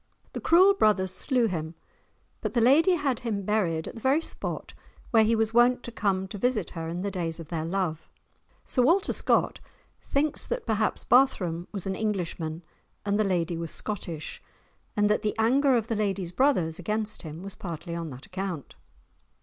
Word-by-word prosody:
The -, -, -5 dB
cruel 370 Hz, +4 st, +6 dB
brothers 200 Hz, -, +2 dB
slew 245 Hz, +5 st, +1 dB
him, 165 Hz, -5 st, -3 dB, 0.7 s
but -, -, -3 dB
the -, -, +4 dB
lady 300 Hz, +10 st, +5 dB
had 280 Hz, -7 st, 0 dB
him 215 Hz, -5 st, -3 dB
buried 185 Hz, -6 st, 0 dB
at -, -, -6 dB
the 230 Hz, -, -10 dB
very 270 Hz, +5 st, +3 dB
spot 330 Hz, -, -5 dB, 0.4 s
where 225 Hz, -2 st, +6 dB
he 225 Hz, +1 st, +3 dB
was 225 Hz, 0 st, 0 dB
wont 245 Hz, +1 st, +4 dB
to 240 Hz, -, -6 dB
come 190 Hz, -4 st, 0 dB
to 205 Hz, -, -7 dB
visit 225 Hz, -5 st, 0 dB
her 165 Hz, -1 st, -5 dB
in 175 Hz, +3 st, -4 dB
the 200 Hz, -, -2 dB
days 170 Hz, -3 st, -3 dB
of 160 Hz, -2 st, -9 dB
their 160 Hz, -2 st, -2 dB
love. 170 Hz, -3 st, -2 dB, 0.6 s
Sir 255 Hz, -, +1 dB
Walter 345 Hz, +10 st, +3 dB
Scott -, -, +1 dB, 0.4 s
thinks 290 Hz, +2 st, 0 dB
that -, -, -3 dB
perhaps 215 Hz, -1 st, 0 dB
Barthram 185 Hz, -10 st, +3 dB
was 195 Hz, -4 st, -5 dB
an 195 Hz, -, -1 dB
Englishman 175 Hz, -6 st, -3 dB, 0.4 s
and 205 Hz, +1 st, +1 dB
the -, -, +4 dB
lady 175 Hz, -3 st, 0 dB
was 165 Hz, -1 st, -4 dB
Scottish, 175 Hz, -7 st, -5 dB, 0.6 s
and 205 Hz, 0 st, +4 dB
that 210 Hz, 0 st, +2 dB
the 210 Hz, -1 st, -1 dB
anger 260 Hz, +4 st, +4 dB
of 225 Hz, -1 st, -2 dB
the 230 Hz, -, -1 dB
lady's 195 Hz, -4 st, -1 dB
brothers 180 Hz, -, +2 dB
against 210 Hz, +3 st, -2 dB
him 160 Hz, +2 st, -8 dB
was 195 Hz, 0 st, -6 dB
partly 170 Hz, -1 st, -6 dB
on 170 Hz, -1 st, -4 dB
that 130 Hz, 0 st, -10 dB
account. 185 Hz, -6 st, -5 dB
205 Hz, 185 wpm, -27 LUFS, 170-235 Hz, 0.7 s, cruel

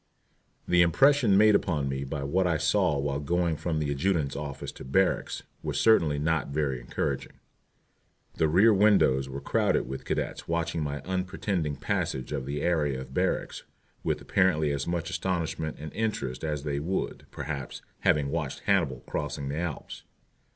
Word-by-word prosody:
The 90 Hz, 0 st, +5 dB
impression 120 Hz, -, +5 dB
made 105 Hz, +1 st, +6 dB
upon 80 Hz, -8 st, +1 dB
me 65 Hz, 0 st, -2 dB
by 70 Hz, +1 st, -4 dB
what 90 Hz, +7 st, +1 dB
I 85 Hz, -2 st, +2 dB
saw 90 Hz, -1 st, +2 dB
while 70 Hz, 0 st, -1 dB
going 85 Hz, +3 st, 0 dB
from 80 Hz, +1 st, -2 dB
the 75 Hz, -2 st, -1 dB
adjutant's 70 Hz, -1 st, 0 dB
office 70 Hz, -1 st, -5 dB
to -, -, -11 dB
barracks 95 Hz, +9 st, 0 dB, 0.2 s
was -, -, -2 dB
certainly 80 Hz, -10 st, +4 dB
not 80 Hz, +1 st, 0 dB
very 70 Hz, -3 st, -1 dB
encouraging. -, -, -3 dB, 1.0 s
The 80 Hz, -, +2 dB
rear 95 Hz, +8 st, +5 dB
windows 95 Hz, -10 st, +4 dB
were 70 Hz, +1 st, -5 dB
crowded 70 Hz, -, +1 dB
with 65 Hz, +1 st, -6 dB
cadets -, -, -3 dB
watching 85 Hz, -1 st, -1 dB
my 75 Hz, -1 st, -3 dB
unpretending 90 Hz, -4 st, -2 dB
passage 65 Hz, -2 st, -2 dB
of 65 Hz, -, -3 dB
the 75 Hz, +1 st, -3 dB
area 75 Hz, -6 st, +1 dB
of 65 Hz, 0 st, -9 dB
barracks -, -, -1 dB, 0.4 s
with -, -, 0 dB
apparently 85 Hz, -6 st, +2 dB
as 70 Hz, -1 st, -2 dB
much 85 Hz, 0 st, -2 dB
astonishment 80 Hz, -3 st, -2 dB
and 75 Hz, 0 st, -7 dB
interest 70 Hz, -, -2 dB
as 75 Hz, -3 st, -2 dB
they 70 Hz, -2 st, -2 dB
would, 90 Hz, +6 st, -3 dB
perhaps, 70 Hz, -2 st, -6 dB, 0.2 s
have -, -, +4 dB
watched 75 Hz, -2 st, -3 dB
Hannibal 65 Hz, -3 st, +1 dB
crossing 75 Hz, -1 st, -3 dB
the 75 Hz, +3 st, -2 dB
Alps. 85 Hz, -4 st, -5 dB
75 Hz, 160 wpm, -28 LUFS, 70-90 Hz, 1.0 s, made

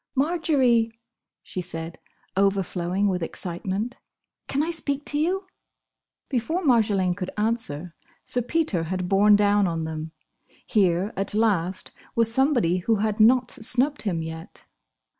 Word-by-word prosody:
"Marjory," 270 Hz, -6 st, +2 dB, 0.5 s
she 185 Hz, -, -5 dB
said, 165 Hz, -1 st, -6 dB, 0.4 s
overflowing 195 Hz, -1 st, +1 dB
with 185 Hz, -2 st, -1 dB
excitement, 190 Hz, +8 st, -4 dB, 0.5 s
"can 280 Hz, +2 st, 0 dB
I 335 Hz, -, -1 dB
speak 290 Hz, -3 st, -3 dB
to 295 Hz, -, -1 dB
you?" 370 Hz, +5 st, 0 dB, 0.8 s
Before 285 Hz, +8 st, -1 dB
Marjolaine 210 Hz, -, +3 dB
could 185 Hz, -1 st, -4 dB
answer, 210 Hz, -7 st, -2 dB, 0.3 s
Sir 245 Hz, -, +2 dB
Peter 245 Hz, -, 0 dB
had 180 Hz, +1 st, -3 dB
borne 205 Hz, +2 st, +5 dB
down 205 Hz, -1 st, +3 dB
on 165 Hz, -1 st, -2 dB
them. 160 Hz, 0 st, -5 dB, 0.5 s
Here, 190 Hz, -1 st, +1 dB
at 195 Hz, +1 st, 0 dB
last, 190 Hz, -5 st, +1 dB, 0.2 s
was 230 Hz, -1 st, +3 dB
somebody 245 Hz, -, +2 dB
who 220 Hz, +5 st, +1 dB
had 215 Hz, +1 st, -1 dB
not 240 Hz, +3 st, +5 dB
snubbed 255 Hz, +6 st, +1 dB
him 175 Hz, -6 st, -2 dB
yet. 160 Hz, 0 st, -9 dB
205 Hz, 130 wpm, -25 LUFS, 180-250 Hz, 0.8 s, borne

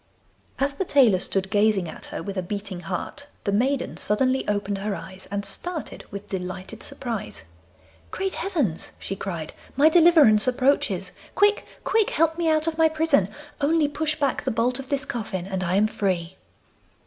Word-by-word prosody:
As 280 Hz, +1 st, 0 dB
the 330 Hz, -, -2 dB
tailor 255 Hz, -, +4 dB
stood 190 Hz, +1 st, -1 dB
gazing 205 Hz, -3 st, +3 dB
at -, -, -8 dB
her -, -, -6 dB
with 195 Hz, +2 st, -5 dB
a 185 Hz, -, 0 dB
beating 195 Hz, 0 st, -5 dB
heart, 185 Hz, -, -5 dB, 0.2 s
the 200 Hz, -, 0 dB
maiden 260 Hz, +7 st, 0 dB
suddenly 255 Hz, +5 st, +1 dB
opened 205 Hz, -1 st, -1 dB
her 205 Hz, 0 st, -2 dB
eyes, 190 Hz, 0 st, -9 dB
and 200 Hz, 0 st, -3 dB
started 320 Hz, -, -4 dB
with 200 Hz, 0 st, -8 dB
delighted 185 Hz, +3 st, -5 dB
surprise. 235 Hz, -, -5 dB, 0.7 s
'Great 385 Hz, 0 st, -2 dB
heavens!' 285 Hz, -, -1 dB
she 195 Hz, -, -5 dB
cried, 170 Hz, -6 st, -5 dB, 0.2 s
'my 300 Hz, +3 st, +7 dB
deliverance 315 Hz, -10 st, +6 dB
approaches! 260 Hz, +2 st, +1 dB, 0.2 s
Quick, 415 Hz, +1 st, +3 dB, 0.2 s
quick, 440 Hz, -2 st, +2 dB
help 325 Hz, +1 st, +2 dB
me 335 Hz, -1 st, +2 dB
out 310 Hz, 0 st, +3 dB
of 325 Hz, -1 st, -2 dB
my 320 Hz, 0 st, +6 dB
prison; 310 Hz, -, +2 dB, 0.3 s
only 305 Hz, +1 st, +3 dB
push 310 Hz, +1 st, -1 dB
back 280 Hz, -3 st, +1 dB
the -, -, 0 dB
bolt 245 Hz, +3 st, 0 dB
of 270 Hz, 0 st, -8 dB
this 280 Hz, 0 st, 0 dB
coffin 195 Hz, -8 st, -4 dB
and 190 Hz, -1 st, -3 dB
I 180 Hz, +1 st, 0 dB
am 205 Hz, +2 st, +4 dB
free. 185 Hz, -5 st, -1 dB
225 Hz, 170 wpm, -25 LUFS, 195-295 Hz, 0.7 s, my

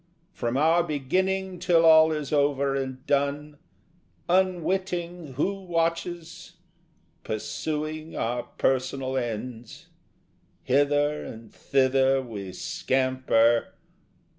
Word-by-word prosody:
From 120 Hz, -4 st, -2 dB
our 165 Hz, +4 st, +4 dB
beginning 185 Hz, +5 st, -1 dB
till 165 Hz, -2 st, +3 dB
all 160 Hz, 0 st, +7 dB
is 150 Hz, -2 st, -3 dB
over 140 Hz, -1 st, +2 dB
and 130 Hz, -1 st, -4 dB
done, 145 Hz, +1 st, -1 dB, 0.7 s
Unwitting 180 Hz, -3 st, -1 dB
who 195 Hz, +9 st, -1 dB
watches, 170 Hz, -1 st, -3 dB, 0.7 s
pursuing 155 Hz, +8 st, -4 dB
our 120 Hz, +2 st, -1 dB
personal 130 Hz, +1 st, -1 dB
ends, 120 Hz, -1 st, -5 dB, 0.7 s
Hither 145 Hz, +2 st, +2 dB
and 110 Hz, -1 st, -10 dB
thither 135 Hz, 0 st, +2 dB
we 105 Hz, -7 st, -7 dB
scamper.... 130 Hz, -1 st, +1 dB
145 Hz, 90 wpm, -26 LUFS, 130-165 Hz, 0.7 s, all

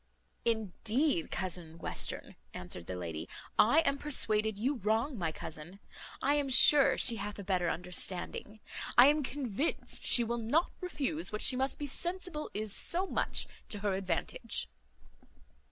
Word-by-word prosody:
"Indeed, 225 Hz, -, -1 dB
cousin 175 Hz, -3 st, -4 dB
Western," 165 Hz, -, -2 dB, 0.2 s
answered 90 Hz, -1 st, -7 dB
the 90 Hz, -, -5 dB
lady, 80 Hz, -3 st, -6 dB, 0.3 s
"I 285 Hz, +10 st, +5 dB
am 280 Hz, -3 st, -1 dB
persuaded 220 Hz, -7 st, +2 dB
you 260 Hz, +6 st, -1 dB
wrong 225 Hz, +6 st, -1 dB
my 170 Hz, -7 st, -2 dB
cousin. 160 Hz, +4 st, -9 dB, 0.4 s
I 280 Hz, -, +3 dB
am 290 Hz, -2 st, 0 dB
sure 275 Hz, +2 st, +6 dB
she 235 Hz, -3 st, +5 dB
hath 205 Hz, 0 st, -6 dB
a 200 Hz, -, -7 dB
better 180 Hz, -3 st, 0 dB
understanding. 180 Hz, +4 st, -3 dB, 0.4 s
I 245 Hz, -, +10 dB
am 300 Hz, +1 st, +1 dB
convinced 270 Hz, 0 st, -3 dB
she 240 Hz, -, +7 dB
will 235 Hz, +1 st, -3 dB
not 265 Hz, +10 st, 0 dB
refuse 325 Hz, -4 st, -3 dB
what 210 Hz, -, -3 dB
she 255 Hz, -, +6 dB
must 265 Hz, +1 st, -1 dB
be 290 Hz, -, -4 dB
sensible 345 Hz, +2 st, -4 dB
is 210 Hz, -1 st, -1 dB
so 360 Hz, +3 st, +2 dB
much -, -, +1 dB, 0.2 s
to 205 Hz, -, -4 dB
her 205 Hz, -2 st, 0 dB
advantage." 185 Hz, -3 st, -1 dB
220 Hz, 150 wpm, -31 LUFS, 185-285 Hz, 0.4 s, I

